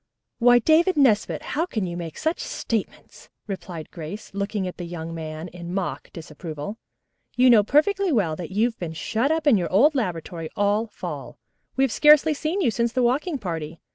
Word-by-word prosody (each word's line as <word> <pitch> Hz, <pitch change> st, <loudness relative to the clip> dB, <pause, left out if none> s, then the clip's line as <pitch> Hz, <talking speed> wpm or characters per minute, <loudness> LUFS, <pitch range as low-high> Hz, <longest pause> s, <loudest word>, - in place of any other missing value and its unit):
"Why, 245 Hz, 0 st, +6 dB
David 320 Hz, +7 st, +3 dB
Nesbit, 235 Hz, -7 st, +2 dB
how 325 Hz, +4 st, 0 dB
can 215 Hz, -, -2 dB
you 175 Hz, -1 st, -5 dB
make 170 Hz, -3 st, -6 dB
such 320 Hz, +2 st, -1 dB
statements?" 225 Hz, -3 st, -5 dB, 0.2 s
replied 180 Hz, -5 st, -7 dB
Grace, 170 Hz, +7 st, -8 dB
looking 200 Hz, -1 st, -2 dB
at 180 Hz, -, -7 dB
the 175 Hz, -, -5 dB
young 165 Hz, -1 st, -6 dB
man 160 Hz, 0 st, -6 dB
in 175 Hz, +1 st, -7 dB
mock 155 Hz, -8 st, -3 dB
disapproval. 160 Hz, +4 st, -7 dB, 0.6 s
"You 250 Hz, 0 st, +6 dB
know 225 Hz, -3 st, +7 dB
perfectly 365 Hz, -, +2 dB
well 190 Hz, -, +1 dB
that 170 Hz, -1 st, -7 dB
you've 225 Hz, +5 st, 0 dB
been 165 Hz, -3 st, -4 dB
shut 225 Hz, -, -1 dB
up 320 Hz, -1 st, 0 dB
in 275 Hz, -7 st, +6 dB
your 175 Hz, -3 st, -2 dB
old 265 Hz, +12 st, +5 dB
laboratory 170 Hz, -, -3 dB
all 205 Hz, +2 st, +1 dB
fall. 210 Hz, -, -7 dB, 0.4 s
We 265 Hz, -, +2 dB
have 270 Hz, -, +2 dB
scarcely 300 Hz, +4 st, +6 dB
seen 315 Hz, +6 st, -2 dB
you 240 Hz, -, +2 dB
since 235 Hz, +1 st, 0 dB
the 255 Hz, -, +1 dB
walking 285 Hz, +7 st, +1 dB
party. 165 Hz, -, -5 dB
210 Hz, 185 wpm, -24 LUFS, 170-265 Hz, 0.6 s, know